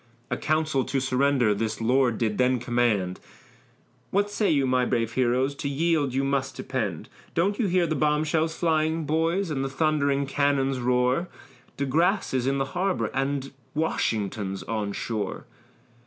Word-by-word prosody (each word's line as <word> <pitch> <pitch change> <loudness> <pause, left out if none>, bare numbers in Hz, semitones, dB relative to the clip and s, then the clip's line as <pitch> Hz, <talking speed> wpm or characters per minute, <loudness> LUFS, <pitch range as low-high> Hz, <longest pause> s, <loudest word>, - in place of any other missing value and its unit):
A - - +2
council 155 -3 0
to 135 - -1
surrender 130 -3 +2
this 110 +1 -2
lord 120 0 +2
did 110 -1 -1
then 125 0 +3
command; 120 -6 0 0.9
"What 205 +1 +1
say 205 0 +1
you, 140 -3 +3
my 130 -1 +2
brave 115 -2 0
heroes, 130 +2 +1
to 140 0 -4
yield 150 -1 +1
you 135 - +1
must 135 -1 -1
depend; - - -3 0.3
Don't 195 +5 +1
you 225 - +2
hear 180 -1 +2
the 160 - -1
bomb 150 +1 +2
shells 160 +1 0
flying, 160 -1 +1
boys, 165 +4 0
and 135 -2 -1
the 135 - -2
thundering 140 -1 +1
cannon's 135 -1 +1
roar? 125 +6 +1 0.5
De 140 - 0
Grasse 170 +8 +1
is 130 -1 0
in 135 0 +1
the 135 - 0
harbor, 185 +1 0
and 135 0 -1 0.2
Washington's 105 -10 -1
on 105 -3 -2
shore." 105 -1 -4
135 Hz, 160 wpm, -26 LUFS, 125-155 Hz, 0.9 s, then